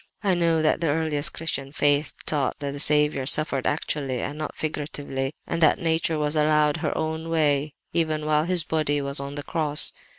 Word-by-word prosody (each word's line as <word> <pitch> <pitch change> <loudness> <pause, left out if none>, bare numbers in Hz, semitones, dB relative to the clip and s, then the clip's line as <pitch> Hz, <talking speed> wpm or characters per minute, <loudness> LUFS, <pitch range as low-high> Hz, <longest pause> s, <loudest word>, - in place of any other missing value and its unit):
"I 195 -2 +3
know 165 -2 +2
that 155 +1 +2
the 165 - +1
earliest 150 -1 0
Christian 140 -4 -3
faith 145 +1 +1
taught 145 -4 -1
that 140 -1 -4
the 140 - -6
Saviour 150 -2 +3
suffered 145 -3 +1
actually 140 -4 -2
and 145 - -4
not 155 0 -5
figuratively, 145 -3 -3
and 170 - -3
that 155 - +5
nature 165 -2 0
was 150 0 0
allowed 150 -1 +3
her - - -2
own 160 +1 -3
way 150 -3 +1 0.2
even 155 -2 0
while 155 0 +2
His 175 -2 0
body 150 -2 0
was 140 0 +1
on 140 +1 -6
the 145 - -5
cross. 150 -2 +1
150 Hz, 190 wpm, -25 LUFS, 145-160 Hz, 0.2 s, that